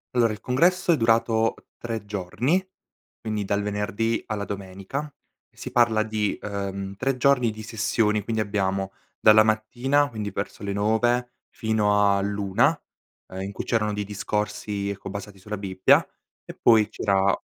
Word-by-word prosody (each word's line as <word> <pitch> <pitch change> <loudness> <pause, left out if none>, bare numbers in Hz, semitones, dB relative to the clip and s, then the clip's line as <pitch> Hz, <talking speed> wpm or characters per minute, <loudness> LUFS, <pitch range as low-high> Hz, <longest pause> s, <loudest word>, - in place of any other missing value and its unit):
Allora 115 -3 +3
il 105 - -10
congresso 175 +8 +2
è 165 - +4
durato 115 -1 +2 0.2
3 115 -3 -4
giorni, 105 - 0 0.6
quindi 105 -2 -2
dal 100 +1 0
venerdì 105 +2 -1
alla 105 -2 -3
domenica 100 +9 -5 0.4
e - - -36
si 130 - -7
parla 115 -3 +3
di, 110 -2 -1
uhm, 100 -1 -4
3 135 +3 0
giorni 125 -2 +3
di 110 0 -7
sessioni. 105 -1 0
Quindi 110 +1 -1
abbiamo: 95 -2 -1 0.3
dalla 110 0 +7
mattina, 125 +7 +1
quindi 105 -3 -4
verso 100 - -5
le 100 -1 -2
9 120 +4 +1 0.2
fino 105 -2 +2
all'1, 100 - +1 0.5
uhm, 95 - -8
in 100 +1 -5
cui - - -4
c'erano 105 -2 0
dei 105 - -2
discorsi, 105 0 -3
ecco, 100 -1 -6
basati 100 0 -8
sulla 105 +2 -6
Bibbia 95 -1 +3 0.4
e - - -9
poi 110 -3 +5
c'era 100 -1 +1
105 Hz, 150 wpm, -25 LUFS, 100-115 Hz, 0.6 s, dalla